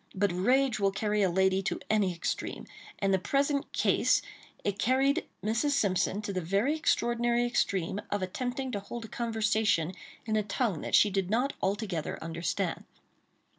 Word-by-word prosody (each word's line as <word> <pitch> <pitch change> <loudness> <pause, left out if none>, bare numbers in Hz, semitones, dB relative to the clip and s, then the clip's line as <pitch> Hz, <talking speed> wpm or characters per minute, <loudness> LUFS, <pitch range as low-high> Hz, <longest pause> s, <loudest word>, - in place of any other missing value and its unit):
But 200 0 +2
rage 245 +6 +2
will 200 -1 +3
carry 210 +1 0
a 190 - +3
lady 190 +2 +2
to 195 - -2
any 210 -4 +2
extreme; 170 -1 -4 0.3
and 195 - 0
in - - +3
the 190 - +3
present 280 - 0
care - - +1 0.6
it 205 -1 -2
carried 265 +3 +2 0.2
Mrs. 230 +7 +1
Simpson 200 -2 +1
to 200 - -3
the 185 - -1
very 200 - +1
extraordinary 240 -5 +1
extreme 200 -5 0
of 205 -2 -1
attempting 250 +7 -3
to 205 - -2
hold 225 +3 -7
a - - -8
conversation 220 -7 +1 0.3
in 220 -1 0
a 215 - +3
tongue 205 - -1
that - - +1
she 205 - +5
did 190 -2 -1
not 250 +6 +1
altogether 195 -5 -2
understand. 165 +1 -2
210 Hz, 170 wpm, -29 LUFS, 190-240 Hz, 0.6 s, she